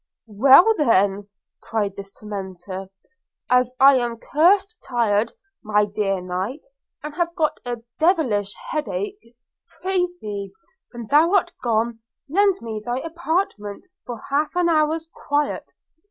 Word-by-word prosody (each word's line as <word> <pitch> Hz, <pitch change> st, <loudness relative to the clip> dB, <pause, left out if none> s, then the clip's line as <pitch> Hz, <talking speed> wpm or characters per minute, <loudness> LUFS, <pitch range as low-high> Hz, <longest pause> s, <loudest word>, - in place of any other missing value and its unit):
'Well, 270 Hz, -, +6 dB
then,' 200 Hz, -6 st, +2 dB, 0.3 s
cried 210 Hz, -3 st, -2 dB
this 200 Hz, 0 st, -8 dB
tormentor, 190 Hz, -2 st, -7 dB, 0.6 s
'as 250 Hz, 0 st, +4 dB
I 275 Hz, 0 st, +7 dB
am 240 Hz, -2 st, -2 dB
cursed 385 Hz, -, +2 dB
tired, 230 Hz, -2 st, +1 dB, 0.3 s
my 210 Hz, -1 st, +2 dB
dear 200 Hz, -2 st, -1 dB
knight, 185 Hz, -, -4 dB, 0.4 s
and 300 Hz, 0 st, -6 dB
have 340 Hz, +1 st, -1 dB
got 315 Hz, -4 st, 0 dB
a 240 Hz, -1 st, -4 dB, 0.2 s
devilish 255 Hz, -, +2 dB, 0.2 s
headach, 225 Hz, -, -3 dB, 0.5 s
prithee, 355 Hz, -, -3 dB, 0.4 s
when 235 Hz, -2 st, -7 dB
thou 310 Hz, -, +4 dB
art 350 Hz, -3 st, +2 dB
gone, 230 Hz, -1 st, 0 dB, 0.3 s
lend 390 Hz, +5 st, +2 dB
me 220 Hz, -2 st, -5 dB
thy 240 Hz, +2 st, -2 dB
apartment 325 Hz, -, -3 dB, 0.2 s
for 240 Hz, -3 st, -7 dB
half 295 Hz, +3 st, 0 dB
an 355 Hz, -1 st, +2 dB
hour's 320 Hz, 0 st, +1 dB
quiet. 290 Hz, +1 st, -2 dB
245 Hz, 125 wpm, -22 LUFS, 205-320 Hz, 0.6 s, I